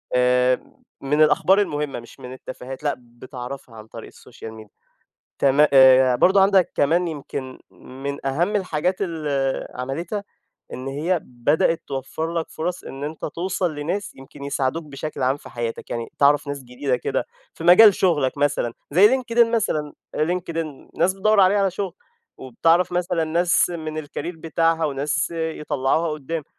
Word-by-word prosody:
آآ، 125 0 +2 0.3
من 145 +3 +1
الأخبار 190 +6 +4
المهمة، 150 -8 -2
مش 120 - -15
من 125 0 -8
التفاهات، 130 +1 -9
لأ، 145 - +1
بتعرفها 125 +1 -10
عن 110 0 -11
طريق 115 0 -10
السوشيال 115 -2 -12
ميديا، 110 -2 -13 0.7
تما 140 +2 +4
آآ، 130 -1 +7
برضه، 190 +8 +4
عندك 195 -2 +3
كمان 170 +5 +2
يمكن 135 -4 -6
من 135 +2 -7
أهم 175 +10 +1
الحاجات 180 -1 -1
اللي 145 -7 -2
عملِتها، 165 +11 -4 0.5
إن 130 +1 -6
هي 160 +6 -1
بدأت 145 +7 0
توفّر 140 +5 -4
لك 165 -1 -2
فرص، 175 +3 -4
إن 135 +1 -8
أنت 155 +2 -5
توصل 180 +1 -2
لناس 170 +8 -4
يمكن 135 +1 -12
يساعدوك 140 +3 -1
بشكل 145 -1 -6
عام 130 +2 +2
في - - -13
حياتك، 120 -1 -5
يعني 115 -1 -4
تعرف 145 0 +4
ناس 140 -1 -5
جديدة 125 +2 -2
كده - - -2 0.3
في - - -10
مجال 190 +4 +8
شغلك 150 -7 +1
مثلًا، 145 -5 0 0.2
زيّ 185 +7 +7
LinkedIn 235 -2 +3
مثلًا، 155 -11 -1 0.2
LinkedIn، 165 -2 -3
ناس 185 - +3
بتدوّر 210 +2 +2
عليه 195 +1 +5
على 195 -2 +2
شغل، 190 -1 -4 0.4
وبتعرف 165 +8 +1
مثلًا 175 -1 0
ناس 170 +3 +2
من 155 -3 -5
الcareer - - -24 0.2
بتاعتها، 165 0 +1
وناس 145 +2 -1
يطلِّعوها 160 -1 -1
قُدَّام، 150 +1 -4
150 Hz, 150 wpm, -22 LUFS, 135-175 Hz, 0.7 s, مجال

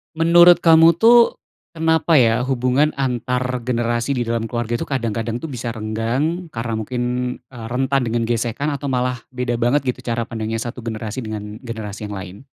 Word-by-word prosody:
Menurut 170 +2 +6
kamu 165 0 +7
tuh, 235 +1 +5 0.3
kenapa 160 -1 +3
ya 115 0 +3
hubungan 130 +3 +1
antar 125 -1 -1
generasi 120 +1 -1
di 125 -3 -1
dalam 115 -1 -1
keluarga 120 0 -2
tuh - - -2
kadang-kadang 115 -3 -2
tuh 160 - -6
bisa 125 -4 -5
renggang, 120 +10 -2
karena 115 -2 -4
mungkin, 120 +3 -3 0.5
eee, 115 -3 -9
rentan 135 +1 +1
dengan 115 -1 -1
gesekan 120 +4 -1
atau 140 0 -4
malah 125 -1 -1
beda 125 -1 -2
banget 120 +4 +2
gitu 125 0 -2
cara 115 -1 -2
pandangnya 115 -1 -3
satu 120 +1 -6
generasi 115 +2 -5
dengan 105 -1 -6
generasi 110 -3 -6
yang - - -5
lain? 95 +4 -10
120 Hz, 165 wpm, -20 LUFS, 115-135 Hz, 0.5 s, kamu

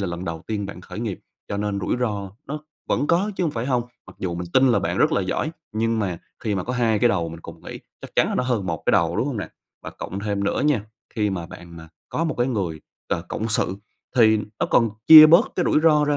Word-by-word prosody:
là 100 - -1
lần 85 +1 -5
đầu 80 -2 -5
tiên 105 -2 -3
bạn 95 - -9
khởi 100 - -8
nghiệp, 110 -5 -4 0.3
cho 100 - -3
nên 100 -1 -2
rủi 100 - -1
ro 105 -5 -2 0.2
nó 150 +2 -4 0.3
vẫn 145 - +1
có 180 +6 +2
chứ 180 - 0
hông 160 - 0
phải 120 -2 -4
hông, 125 -3 +1 0.2
mặc - - -14
dù 90 -2 -3
mình 90 0 -5
tin 130 0 +5
là 100 - +3
bạn 85 0 -2
rất - - +3
là - - +2
giỏi 95 +11 -2 0.2
nhưng 115 +1 0
mà 95 -5 -2 0.2
khi 110 -3 -1
mà 95 - -2
có 125 - -3
2 115 -4 +1
cái 120 - +4
đầu 85 -6 0
mình 80 0 -9
cùng - - -11
nghĩ - - -8 0.2
chắc - - -11
chắn - - +4
là - - -2
nó - - +1
hơn 120 -6 -1
1 80 -3 -3
cái - - +4
đầu, - - +2
đúng - - 0
hông - - -3
nè? - - -4 0.3
Và - - -7
cộng 95 +2 -6
thêm 100 -1 -2
nữa - - 0
nha, 140 -9 +1 0.3
khi 105 -3 0
mà 85 -3 -4
bạn 85 -1 -12 0.3
có 165 - -2
một 155 - -1
cái 120 - +2
người, 95 -11 -2 0.3
ờ, 85 - -1
cộng 110 - -3
sự 95 -3 0 0.4
thì 110 -2 +6 0.2
nó - - +2
còn 115 -2 +4 0.2
chia 155 -1 +12
bớt 170 +11 +6
cái 180 - +1
rủi - - +3
ro 155 -2 +4
ra 145 0 +1
110 Hz, 270 wpm, -23 LUFS, 95-125 Hz, 0.4 s, chia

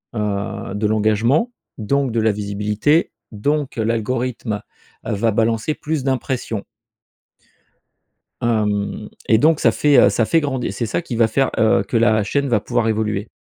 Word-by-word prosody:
heu, 100 -2 -3
de 105 +1 -1
l'engagement, 110 - +2 0.3
donc, 135 +4 0
de 115 - 0
la 110 0 +3
visibilité. 105 - 0 0.2
Donc, 140 +6 -1
l'algorithme 115 0 -2 0.4
va 110 +2 0
balancer 115 +6 0
plus 155 -2 -3
d'impressions. 130 -5 -2 1.8
Hem, 105 -2 -1 0.2
et 110 - +6
donc, 155 +5 +3
ça - - +4
fait, 145 -2 +3
heu, - - +6
ça 115 - +1
fait 165 +7 +2
grand 140 -3 -2
c'est 100 +4 -3
ça 115 - -2
qui 150 -8 -6
va 115 -1 +4
faire, 135 +5 +1
heu, 110 -3 +3
que 115 - -1
la 110 -2 +3
chaîne 140 +7 -1
va 115 - +3
pouvoir 120 +1 -1
évoluer. 110 -1 -1
115 Hz, 150 wpm, -20 LUFS, 105-130 Hz, 1.8 s, et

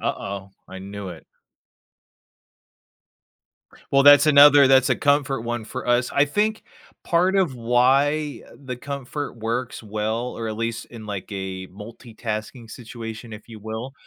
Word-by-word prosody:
Uh-oh, 100 0 -4 0.2
I 95 - -9
knew 100 0 -8
it. 80 -4 -10 2.7
Well, 140 0 +5
that's 145 0 +8
another 145 -1 +8
that's 130 -1 +5
a - - +2
comfort 140 -3 +1
one 120 -2 -4
for 130 +1 -7
us. 120 0 +2
I 140 - +5
think 210 +9 -1 0.4
part 180 +3 +2
of 175 -9 +1
why 135 +5 +1
the 130 -2 -7
comfort 140 +1 -6
works 115 +2 -4
well, 110 +3 -3
or 115 -1 -5
at 110 - -5
least 115 0 -3
in 115 -3 -11
like 100 -1 -6
a 95 -1 -5
multitasking 110 +2 -8
situation, 115 -2 -8
if 105 +2 -14
you 110 - -9
will, 110 +5 -6
120 Hz, 140 wpm, -23 LUFS, 110-140 Hz, 2.7 s, that's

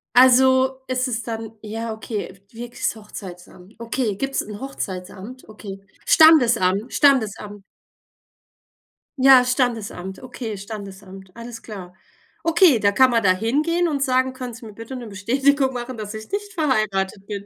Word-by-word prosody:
Also, 260 +1 +5
es 255 0 -1
ist 235 -2 -4
dann 225 -1 -5
Ja, 225 +1 -5
okay, 220 -3 -6 0.2
wirklich's 240 +1 -4
Hochzeitsamt. 185 -2 -12
Okay, 230 -3 -2
gibt's 270 +2 -2
'n 210 0 -9
Hochzeitsamt? 205 -2 -7
Okay. 200 -2 -9 0.3
Standesamt, 235 - +5
Standesamt. 210 -7 +1 1.6
Ja, 260 -1 +7
Standesamt, 230 -7 -2
okay, 235 -4 -6
Standesamt, 195 -2 -10
alles 235 0 -9
klar. 185 -5 -10 0.5
Okay, 330 - +4
da 200 0 +3
kann 260 +4 +4
man 230 -1 +2
da 185 -2 +4
hingehen 300 - 0
und 285 -3 -2
sagen: 260 -1 +1
„Können 255 -2 -7
sie 230 +1 -11
mir 215 - -10
bitte 230 +4 -9
'ne 240 -3 -7
Bestätigung 265 +7 +1
machen, 245 0 -6
dass 215 0 -6
ich 220 - -9
nicht 410 0 -4
verheiratet 210 - -1
bin?“ 200 -1 -6
230 Hz, 140 wpm, -22 LUFS, 205-260 Hz, 1.6 s, Ja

